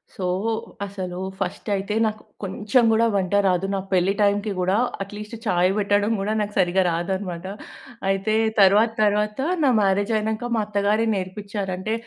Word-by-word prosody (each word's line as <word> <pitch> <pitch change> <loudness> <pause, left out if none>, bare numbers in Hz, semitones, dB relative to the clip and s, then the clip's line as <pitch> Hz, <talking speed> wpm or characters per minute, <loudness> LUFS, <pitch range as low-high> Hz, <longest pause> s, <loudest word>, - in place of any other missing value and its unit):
So, 185 - -4 0.6
అసలు 185 -2 -6 0.2
first 190 +3 -4
అయితే 195 +2 -3
నాకు 215 0 -3 0.2
కొంచెం 210 +5 +1
కూడా 230 +1 +3
వంట 190 0 0
రాదు. 185 0 +2
నా - - -1
పెళ్లి 185 +2 +3
టైమ్‌కి 205 +1 +2
కూడా 185 +2 +1 0.3
అట్లీస్ట్ 210 +3 -8
చాయ్ 180 -2 +3
పెట్టడం 205 +1 +2
కూడా 210 +2 -1
నాకు 210 0 -2
సరిగ్గా 185 +1 +3
రాదన్నమాట. 175 +1 -3 0.6
అయితే 195 +2 0 0.3
తరువాత 205 +4 +5
తరువాత 210 +3 +1 0.2
నా 270 - +5
మ్యారేజ్ 200 +3 +1
అయినంకా 220 +2 -2
మా 220 - +1
అత్తగారే 210 +2 +1
నేర్పించారు. 195 +1 -4
అంటే 215 +4 -3
200 Hz, 150 wpm, -23 LUFS, 190-210 Hz, 0.6 s, తరువాత